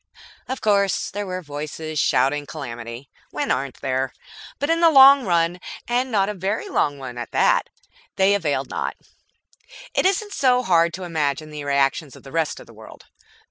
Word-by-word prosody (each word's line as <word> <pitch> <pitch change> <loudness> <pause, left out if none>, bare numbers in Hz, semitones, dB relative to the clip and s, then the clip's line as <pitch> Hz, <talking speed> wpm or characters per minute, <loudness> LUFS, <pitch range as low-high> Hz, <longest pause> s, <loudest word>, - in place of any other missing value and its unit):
Of 260 - -4
course 200 -2 +1
there 205 0 -4
were 185 0 -4
voices 150 +1 -5
shouting 140 +3 +1
calamity. 120 -3 -7 0.2
When - - -2
aren't 135 0 -2
there? 130 -1 -1 0.4
But 285 +3 -1
in 330 - +2
the 335 - +7
long 275 -4 +8
run, 170 0 +1 0.3
and 245 +2 0
not 195 -3 +2
a 210 - -2
very 200 - -3
long 145 - 0
one 125 -3 -7
at 120 - -6
that, - - +3 0.5
they 195 +1 +4
availed 145 -8 -1
naught. - - -3 1.0
It - - +3
isn't 405 +2 -1
hard 190 -11 +3
to 185 - -7
imagine 155 -3 -2
the 150 -1 -6
reactions 140 +1 0
of - - -15
the 135 - -12
rest 165 -2 -1
of - - -12
the - - -16
world. - - -14
165 Hz, 175 wpm, -22 LUFS, 140-210 Hz, 1.0 s, long